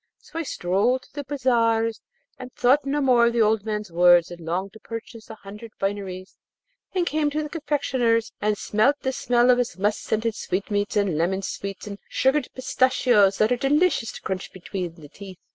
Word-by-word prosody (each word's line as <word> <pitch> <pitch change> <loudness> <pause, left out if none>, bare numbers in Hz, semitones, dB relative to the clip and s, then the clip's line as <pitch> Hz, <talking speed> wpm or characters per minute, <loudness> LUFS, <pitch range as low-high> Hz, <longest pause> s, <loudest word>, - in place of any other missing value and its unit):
So 325 - -8
I - - 0
strolled 240 - 0
through 290 - -7
the 275 - -15
bazaars 230 -5 +1 0.4
and 255 0 -8
thought 275 +4 +3
no 290 +1 0
more 245 -3 +4
of 235 - 0
the 235 -1 +3
old 215 -1 +2
man's 210 -3 -3
words, 175 0 +5
and 175 -1 -9
longed 185 +4 -3
to 220 - -13
purchase 230 0 -9
a 220 - -8
hundred 210 +2 -11
fineries, 195 -2 -4 0.6
and 360 -2 +1
came 305 -2 0
to 305 +1 -2
the 300 - -6
confectioner's, 260 -8 0
and 210 0 +1
smelt 215 +9 +2
the 265 - -1
smell 245 0 +3
of 245 - +3
his 245 -4 -2
musk 205 +2 0
scented 220 +1 -1
sweetmeats 205 +1 -2
and 190 -7 +1
lemon 190 +3 0
sweets 195 +1 -5
and 200 -1 -7
sugared 265 +1 +1
pistachios 250 -6 +3
that 215 +2 +2
are 245 - +2
delicious 285 -2 +2
to - - -9
crunch 190 0 -4
between 180 -2 -6
the 155 -4 -13
teeth. 190 +4 -11
225 Hz, 195 wpm, -24 LUFS, 195-255 Hz, 0.6 s, words